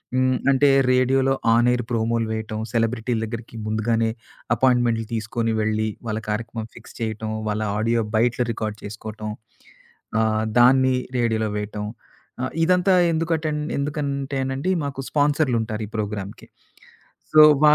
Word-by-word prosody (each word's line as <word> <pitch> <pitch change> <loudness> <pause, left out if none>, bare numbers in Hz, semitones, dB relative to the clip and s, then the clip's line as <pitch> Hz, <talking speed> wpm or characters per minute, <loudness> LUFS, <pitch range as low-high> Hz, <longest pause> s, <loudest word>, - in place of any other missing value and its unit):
హ్మ్, 130 0 +2
అంటే 140 +1 +4 0.2
రేడియోలో 135 +1 +3 0.2
ఆన్ 120 +1 +4
ఏర్ 120 -1 -1
ప్రోమోలు 115 0 0
వేయటం, 110 -1 -4
సెలబ్రిటీల 115 0 0
దగ్గరికి 115 +1 -7
ముందుగానే 110 +1 +1 0.5
అపాయింట్మెంట్లు 120 -2 +2
తీసుకొని 115 +1 -1
వెళ్ళి, 110 0 0 0.2
వాళ్ళ 110 0 -1
కార్యక్రమం 115 +1 -3
ఫిక్స్ - - -13
చేయటం, 110 -1 -3 0.2
వాళ్ళ 105 +1 -1 0.2
ఆడియో 115 +2 +1 0.2
బయట్ల 120 +2 +2
రికార్డ్ 110 -1 -4
చేసుకోవటం. 105 +1 -6 0.9
ఆహ్, 110 0 +1 0.2
దాన్ని 130 +1 +5 0.2
రేడియోలో 110 -2 +1
వేయటం. 105 0 -4 0.6
ఆహ్, 130 - -2
ఇదంతా 180 +2 +3 0.2
ఎందుకటన్ 160 -2 -1 0.2
ఎందుకంటేనండి 140 +1 -2
మాకు 140 -1 -5
స్పాన్సర్లుంటారు, 130 -7 +1
ఈ - - -15
ప్రోగ్రామ్‌కి. 105 -1 -5 0.8
సో 155 0 +8 0.2
వా 150 0 +8
115 Hz, 120 wpm, -23 LUFS, 110-135 Hz, 0.9 s, సో